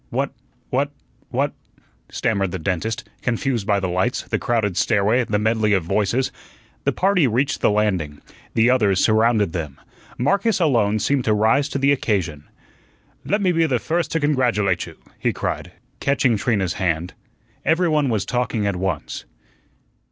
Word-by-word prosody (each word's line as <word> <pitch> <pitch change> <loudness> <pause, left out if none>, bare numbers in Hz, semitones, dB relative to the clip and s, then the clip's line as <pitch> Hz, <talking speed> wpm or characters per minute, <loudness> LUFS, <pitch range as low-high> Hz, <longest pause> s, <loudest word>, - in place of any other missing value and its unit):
"What - - -1 0.4
what - - +1 0.4
what," - - 0 0.6
stammered 100 -4 0
the 95 - -4
dentist, 100 +5 -2
confused 120 -2 -1
by 100 -1 +3
the 95 - -2
lights, 95 +8 0
the - - -2
crowded 110 -6 0
stairway, 105 +8 +2
the 105 - 0
medley 110 0 +2
of 95 -4 +2
voices. 105 +8 0 0.5
The - - +3
party 185 -6 +2
reached 130 +5 0
the - - +4
landing. 95 -9 0 0.4
The 115 +2 +4
others 105 -7 +3
surrounded 110 -4 +3
them. 75 -6 -5 0.4
Marcus 200 - +1
alone 115 - +2
seemed 135 +4 0
to 110 - +3
rise 115 +7 +2
to - - -2
the 140 +1 +3
occasion. 90 - -1 0.8
"Le' 205 - +2
me 195 -4 +2
be 165 -1 +2
the 130 -4 +1
first 165 +8 -1
to 165 - +2
congratulate 120 - +1
you," - - -12 0.2
he - - +1
cried, - - -4 0.3
catching 135 -4 +2
Trina's 100 -5 0
hand. 85 -1 -1 0.5
Every 170 +2 +2
one 150 -4 +2
was 110 -4 0
talking 120 -4 -1
at 100 -3 0
once. 90 -5 -3
110 Hz, 160 wpm, -22 LUFS, 100-135 Hz, 0.8 s, the